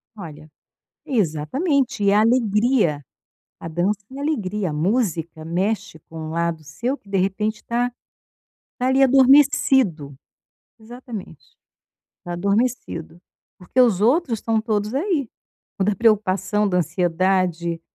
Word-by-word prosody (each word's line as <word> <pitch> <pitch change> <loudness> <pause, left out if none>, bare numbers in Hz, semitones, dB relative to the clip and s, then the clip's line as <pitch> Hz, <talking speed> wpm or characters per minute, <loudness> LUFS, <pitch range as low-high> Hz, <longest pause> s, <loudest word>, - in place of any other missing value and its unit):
Olha, 155 -6 -10 0.6
exatamente. 240 - 0
E 200 - +4
a 210 +1 +4
alegria. 220 - +2 0.6
A - - -7
dança 180 +5 0
é 270 - -8
alegria, 210 - -2
a - - -5
música 170 -3 -1
mexe 195 +2 -2
com 160 - -9
um 155 0 -6
lado 170 -1 -2
seu 235 - -3
que - - -28
de 195 0 -1
repente 205 +3 -1
tá, 240 +1 -1 0.9
tá 250 - -1
ali 265 +1 +3
adormecido. 265 - +4 0.7
Exatamente. 225 - -10 0.7
Tá 175 - -5
adormecido, 200 -3 -2 0.4
porque 185 +8 -1
os 225 -7 +4
outros 240 - +2
estão 225 -1 0
todos 215 -1 -2
aí. 295 - -1 0.5
O - - +3
da 210 +1 +1
preocupação, 210 -1 +1
da 180 -2 +1
ansiedade, 175 0 0
205 Hz, 125 wpm, -22 LUFS, 175-245 Hz, 0.9 s, E